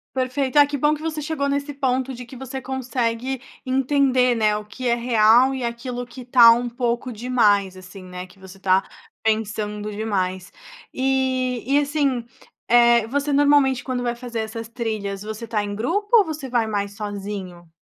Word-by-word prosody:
Perfeito, 260 Hz, +2 st, -1 dB
ah, -, -, +8 dB
que 285 Hz, 0 st, -4 dB
bom 295 Hz, +3 st, +3 dB
que 305 Hz, -, -9 dB
você 315 Hz, -1 st, -3 dB
chegou 295 Hz, -2 st, -2 dB
nesse 280 Hz, +1 st, -2 dB
ponto 260 Hz, -1 st, -1 dB
de 250 Hz, +1 st, -8 dB
que 245 Hz, +2 st, -12 dB
você 265 Hz, +1 st, -6 dB
consegue 255 Hz, -1 st, -2 dB, 0.2 s
entender, 260 Hz, -1 st, +2 dB
né, 215 Hz, -2 st, +2 dB
o 210 Hz, -, -6 dB
que 250 Hz, +5 st, -7 dB
é 235 Hz, -, +3 dB
real 235 Hz, +1 st, +4 dB
e 260 Hz, -2 st, -4 dB
aquilo 245 Hz, +1 st, -4 dB
que 245 Hz, +2 st, -11 dB
está 245 Hz, -2 st, +7 dB
um 240 Hz, +1 st, 0 dB
pouco 240 Hz, +1 st, -2 dB
demais 210 Hz, -5 st, +2 dB
assim, 185 Hz, +1 st, -12 dB
né, 180 Hz, 0 st, -7 dB
que 185 Hz, +2 st, -18 dB
você 190 Hz, 0 st, -13 dB
tá 190 Hz, 0 st, +2 dB, 0.4 s
pensando 210 Hz, -1 st, -1 dB
demais. 190 Hz, -3 st, -3 dB, 0.4 s
E 260 Hz, -2 st, 0 dB
e 280 Hz, +2 st, +3 dB
assim, 280 Hz, -4 st, 0 dB, 0.4 s
eh, 235 Hz, -1 st, +5 dB
você 285 Hz, +3 st, -1 dB
normalmente 285 Hz, -2 st, +4 dB
quando 250 Hz, -2 st, -3 dB
vai 240 Hz, -1 st, -1 dB
fazer 240 Hz, -1 st, -6 dB
essas 220 Hz, +1 st, -5 dB
trilhas, 215 Hz, -4 st, -4 dB
você 220 Hz, +2 st, -6 dB
está 210 Hz, -2 st, -1 dB
em 205 Hz, 0 st, -4 dB
grupo 340 Hz, -, -1 dB
ou 415 Hz, -, +5 dB
você 305 Hz, -5 st, -6 dB
vai 235 Hz, -3 st, 0 dB
mais 200 Hz, -1 st, -3 dB
sozinho? 195 Hz, -4 st, -6 dB
240 Hz, 180 wpm, -22 LUFS, 210-265 Hz, 0.4 s, ah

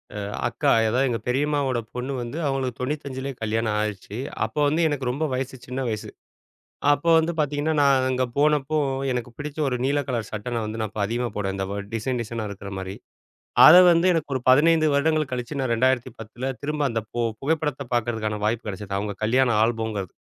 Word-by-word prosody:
அ. -, -, -4 dB, 0.3 s
அக்கா, -, -, +1 dB, 0.2 s
எதா 120 Hz, +4 st, +1 dB
எங்க 115 Hz, -, -1 dB
பெரியம்மாவோட 135 Hz, -1 st, +1 dB, 0.2 s
பொண்ணு 130 Hz, +3 st, -3 dB
வந்து 120 Hz, +6 st, -5 dB
அவங்களுக்கு 135 Hz, -3 st, -2 dB
95 135 Hz, 0 st, -3 dB
கல்யாணம் 110 Hz, 0 st, 0 dB
ஆயிருச்சு. 105 Hz, 0 st, -4 dB, 0.3 s
அப்போ -, -, -5 dB
வந்து 155 Hz, +4 st, +1 dB
எனக்கு 140 Hz, -4 st, -2 dB
ரொம்ப 145 Hz, +5 st, -1 dB
வயசு 130 Hz, +1 st, -3 dB
சின்ன 130 Hz, +1 st, -3 dB
வயசு. 110 Hz, -2 st, -4 dB, 0.8 s
அப்போ 145 Hz, +4 st, +1 dB
வந்து 165 Hz, +1 st, +1 dB
பாத்தீங்கன்னா 150 Hz, +2 st, 0 dB
நான் 135 Hz, -2 st, +4 dB
அங்க 130 Hz, 0 st, +1 dB
போனப்போ 150 Hz, +1 st, +2 dB, 0.3 s
எனக்கு 125 Hz, 0 st, -3 dB
பிடிச்ச 150 Hz, +1 st, -6 dB
ஒரு 125 Hz, -, -1 dB
நீல 145 Hz, +2 st, +2 dB
கலர் 120 Hz, -4 st, -2 dB
சட்ட 110 Hz, +3 st, -4 dB
நான் 115 Hz, -2 st, -1 dB
வந்து 110 Hz, 0 st, -3 dB
அப்ப 105 Hz, -, -6 dB
அதிகமா 120 Hz, +2 st, -1 dB
போடுவ. 95 Hz, -2 st, -1 dB
அந்த 95 Hz, -, -2 dB, 0.3 s
டிசைன் 120 Hz, +2 st, -1 dB
டிசைனா 115 Hz, 0 st, -5 dB
இருக்குற 100 Hz, 0 st, -8 dB
மாரி. 95 Hz, 0 st, -5 dB, 0.7 s
அத 160 Hz, -, +10 dB, 0.2 s
வந்து 170 Hz, +2 st, +3 dB
எனக்கு 155 Hz, -4 st, -2 dB
ஒரு 130 Hz, -, -1 dB
15 155 Hz, +4 st, +5 dB
வருடங்கள் 155 Hz, 0 st, +1 dB
கழிச்சு 125 Hz, +4 st, -4 dB
நான் 130 Hz, -3 st, 0 dB
2010 125 Hz, 0 st, -1 dB
திரும்ப 150 Hz, 0 st, -2 dB
அந்த. 115 Hz, -, -1 dB
பு 120 Hz, -, -2 dB, 0.2 s
புகைப்படத்த 150 Hz, 0 st, -1 dB
பாக்கறதுக்கான 110 Hz, -3 st, -1 dB
வாய்ப்பு 115 Hz, +2 st, -1 dB
கிடைச்சது. 100 Hz, 0 st, -5 dB
அவங்க 105 Hz, 0 st, -3 dB
கல்யாணம் 120 Hz, 0 st, +3 dB
ஆல்பம்ங்கறது. 110 Hz, -5 st, -2 dB
125 Hz, 175 wpm, -24 LUFS, 110-145 Hz, 0.8 s, அத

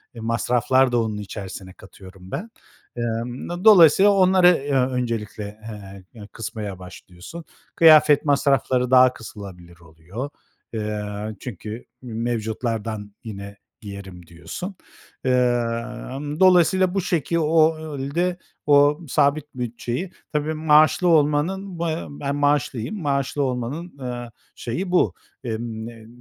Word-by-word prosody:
masraflar 120 Hz, +3 st, +1 dB
da 120 Hz, -1 st, +2 dB
onun 110 Hz, -2 st, -3 dB
içerisine 95 Hz, -2 st, -8 dB
katıyorum 95 Hz, -1 st, -14 dB
ben. 220 Hz, +6 st, -5 dB, 0.5 s
Emm, 120 Hz, +1 st, -4 dB
do 175 Hz, +1 st, -5 dB
dolayısıyla 195 Hz, -1 st, +7 dB
onları, 185 Hz, -2 st, +5 dB
eee, 145 Hz, -5 st, +2 dB
öncelikle, 120 Hz, -5 st, -1 dB, 0.3 s
eee, 100 Hz, -2 st, -10 dB
eee, 105 Hz, -4 st, -11 dB
kısmaya 110 Hz, -4 st, -6 dB
başlıyorsun. 90 Hz, -, -11 dB, 0.3 s
Kıyafet 155 Hz, -3 st, +6 dB
masrafları 135 Hz, -3 st, +2 dB
daha 130 Hz, -1 st, +6 dB
kısılabilir 90 Hz, -7 st, -11 dB
oluyor. 85 Hz, -, -8 dB, 0.4 s
Eee, 105 Hz, -1 st, -3 dB, 0.3 s
çünkü 110 Hz, 0 st, -7 dB, 0.2 s
m 125 Hz, -3 st, -9 dB
mevcutlardan 110 Hz, -2 st, -3 dB
yine 100 Hz, -2 st, -8 dB, 0.3 s
giyerim 95 Hz, -4 st, -10 dB
diyorsun. 180 Hz, -, -7 dB, 0.5 s
Emm, 125 Hz, +3 st, -1 dB
dolayısıyla 185 Hz, 0 st, +4 dB
bu 195 Hz, -, 0 dB
şekil 170 Hz, -2 st, -1 dB
ol 155 Hz, -3 st, +1 dB
de, 175 Hz, +1 st, 0 dB, 0.3 s
o 145 Hz, +1 st, +5 dB
sabit 145 Hz, +1 st, +2 dB
bütçeyi, 125 Hz, +7 st, -4 dB, 0.2 s
tabii, 150 Hz, +1 st, -1 dB
maaşlı 155 Hz, +3 st, +4 dB
olmanın, 165 Hz, +4 st, +1 dB
b -, -, -1 dB, 0.3 s
ben 105 Hz, -, -4 dB
maaşlıyım, 145 Hz, -, 0 dB
maaşlı 140 Hz, -1 st, -1 dB
olmanın, 135 Hz, +6 st, -4 dB
eee, 120 Hz, -2 st, -6 dB, 0.2 s
şeyi 175 Hz, +11 st, -4 dB
bu. 180 Hz, -, +3 dB, 0.3 s
Emm, 110 Hz, -1 st, -4 dB
n 115 Hz, -2 st, -12 dB
125 Hz, 115 wpm, -22 LUFS, 110-155 Hz, 0.5 s, dolayısıyla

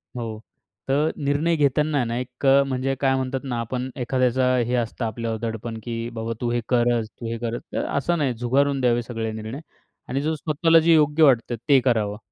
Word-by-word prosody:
हो. 110 Hz, -3 st, -5 dB, 0.5 s
तर 145 Hz, +4 st, +1 dB
निर्णय 145 Hz, +3 st, +1 dB
घेताना 145 Hz, 0 st, +2 dB
ना, 115 Hz, 0 st, -3 dB
एक 125 Hz, +2 st, -6 dB
अ, 135 Hz, +1 st, +6 dB
म्हणजे 135 Hz, 0 st, -1 dB
काय 135 Hz, -1 st, +2 dB
म्हणतात 130 Hz, 0 st, -2 dB
ना 125 Hz, -4 st, -3 dB
आपण 125 Hz, +3 st, -3 dB
एखाद्याचा 130 Hz, +1 st, +1 dB
हे 120 Hz, 0 st, 0 dB
असतं 120 Hz, 0 st, -2 dB
आपल्यावर 115 Hz, 0 st, -3 dB
दडपण. 115 Hz, 0 st, -4 dB
की 115 Hz, 0 st, -4 dB
"बाबा 115 Hz, 0 st, -3 dB
तू 120 Hz, -1 st, 0 dB
हे 120 Hz, -, 0 dB
कर, 120 Hz, -1 st, +3 dB
तू 115 Hz, +2 st, -9 dB
हे 115 Hz, -, -3 dB
कर." 120 Hz, 0 st, -3 dB, 0.2 s
तर -, -, -1 dB
असं 170 Hz, +5 st, 0 dB
नाही. 140 Hz, -5 st, 0 dB
झुगारून 135 Hz, +4 st, +1 dB
द्यावे 120 Hz, -1 st, +2 dB
सगळे 115 Hz, -2 st, -4 dB
निर्णय. 110 Hz, +4 st, -6 dB, 0.5 s
आणि 135 Hz, -, -1 dB
स्वतःला 165 Hz, +2 st, +3 dB
जे 165 Hz, +1 st, +4 dB
योग्य 150 Hz, 0 st, +4 dB
वाटतं 125 Hz, -4 st, +4 dB
ते 140 Hz, -2 st, +7 dB
करावं. 105 Hz, -5 st, +1 dB
125 Hz, 190 wpm, -23 LUFS, 115-140 Hz, 0.5 s, ते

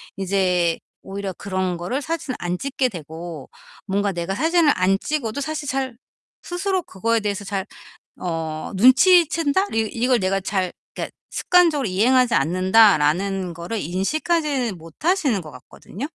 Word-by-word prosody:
이제 180 Hz, -3 st, +1 dB, 0.2 s
오히려 195 Hz, 0 st, -5 dB
그런 185 Hz, -2 st, -2 dB
거를 215 Hz, +12 st, -3 dB
사진을 300 Hz, -4 st, -3 dB
안 175 Hz, +1 st, -2 dB
찍게 265 Hz, 0 st, -1 dB
되고 165 Hz, -, -8 dB, 0.4 s
뭔가 200 Hz, 0 st, 0 dB
내가 175 Hz, +1 st, -3 dB
사진을 325 Hz, 0 st, +3 dB
안 185 Hz, +1 st, +2 dB
찍어도 285 Hz, -5 st, -3 dB
사실 295 Hz, 0 st, -4 dB
잘 260 Hz, -2 st, -2 dB, 0.5 s
스스로 375 Hz, +1 st, -1 dB
그거에 230 Hz, +1 st, 0 dB
대해서 205 Hz, -1 st, -3 dB
잘 195 Hz, -1 st, -3 dB, 0.6 s
어 160 Hz, -3 st, -4 dB
눈치챈다? 330 Hz, -, +4 dB
이 225 Hz, -, +3 dB
이걸 245 Hz, +1 st, +2 dB
내가 195 Hz, 0 st, 0 dB
잘 185 Hz, -2 st, -1 dB, 0.2 s
그러니까 -, -, -5 dB, 0.2 s
'습관적으로 335 Hz, -6 st, +3 dB
이행하지 240 Hz, +5 st, +3 dB
않는다.'라는 185 Hz, +1 st, +3 dB
거를 170 Hz, +7 st, -5 dB
인식하지 265 Hz, -, -1 dB
못하시는 230 Hz, -, -1 dB
것 155 Hz, -, -10 dB
같거든요? 190 Hz, -, -9 dB
200 Hz, 315 characters per minute, -22 LUFS, 180-280 Hz, 0.6 s, 눈치챈다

